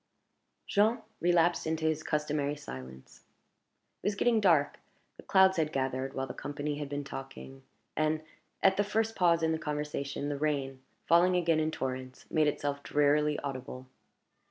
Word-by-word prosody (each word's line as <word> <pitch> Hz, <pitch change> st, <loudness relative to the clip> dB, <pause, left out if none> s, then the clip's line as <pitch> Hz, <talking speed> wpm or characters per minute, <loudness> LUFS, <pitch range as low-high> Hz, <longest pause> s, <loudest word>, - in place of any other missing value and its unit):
Jean 220 Hz, +3 st, +2 dB, 0.2 s
relapsed 175 Hz, -1 st, +2 dB
into 160 Hz, 0 st, -1 dB
his 155 Hz, -1 st, +1 dB
customary 150 Hz, -2 st, -1 dB
silence. 65 Hz, -, -10 dB, 0.8 s
It -, -, -3 dB
was 205 Hz, -, +1 dB
getting 230 Hz, +1 st, +2 dB
dark; 160 Hz, -7 st, +3 dB, 0.4 s
the -, -, -10 dB
clouds 190 Hz, -1 st, +4 dB
had 155 Hz, -2 st, +1 dB
gathered 135 Hz, -1 st, -2 dB
while 135 Hz, -, -1 dB
the 125 Hz, -, -7 dB
company 145 Hz, 0 st, -4 dB
had 145 Hz, -2 st, -5 dB
been 145 Hz, 0 st, -3 dB
talking; 135 Hz, 0 st, -9 dB, 0.3 s
and, 155 Hz, 0 st, 0 dB, 0.4 s
at 190 Hz, 0 st, +5 dB
the 205 Hz, -, +3 dB
first 220 Hz, +2 st, -1 dB
pause 170 Hz, -2 st, +3 dB
in 160 Hz, -, +2 dB
the 160 Hz, -, -1 dB
conversation, 150 Hz, -2 st, -3 dB
the 145 Hz, -1 st, -3 dB
rain, 140 Hz, -3 st, -1 dB, 0.2 s
falling 175 Hz, +2 st, +5 dB
again 170 Hz, -3 st, +2 dB
in 155 Hz, 0 st, +1 dB
torrents, 130 Hz, -3 st, -5 dB
made 155 Hz, -2 st, +3 dB
itself 145 Hz, -1 st, -2 dB
drearily 150 Hz, +1 st, +2 dB
audible. 130 Hz, -2 st, -6 dB
150 Hz, 155 wpm, -30 LUFS, 140-170 Hz, 0.8 s, at